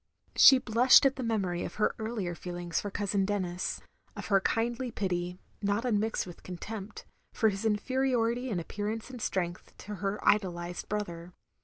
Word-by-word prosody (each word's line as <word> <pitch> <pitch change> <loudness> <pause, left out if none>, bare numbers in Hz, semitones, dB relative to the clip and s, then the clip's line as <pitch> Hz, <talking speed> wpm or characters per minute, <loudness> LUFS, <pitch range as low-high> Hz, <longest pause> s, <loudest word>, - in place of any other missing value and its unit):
She 270 - +9
blushed 250 +3 +6
at 270 0 +4
the 265 - -5
memory 195 -7 -1
of - - -6
her 210 - +1
earlier 220 -5 -3
feelings 175 -1 -3
for 205 - -4
Cousin 200 0 0
Denis; 185 -3 -2 0.3
of - - -7
her 195 -2 +4
kindly 235 +4 0
pity, 180 -4 -2 0.2
not 205 +3 0
unmixed 220 -2 0
with 175 -2 -11
contempt, 200 +3 -7 0.3
for 220 - +4
his 200 +2 -4
inferiority 245 +2 +1
in 195 -6 -1
appearance 210 +7 -4
and 250 -3 -8
strength 180 -3 -3
to 210 0 -7
her 200 +1 -1
idolised 175 -4 +1
brother. 175 -4 -4
205 Hz, 160 wpm, -30 LUFS, 180-225 Hz, 0.3 s, She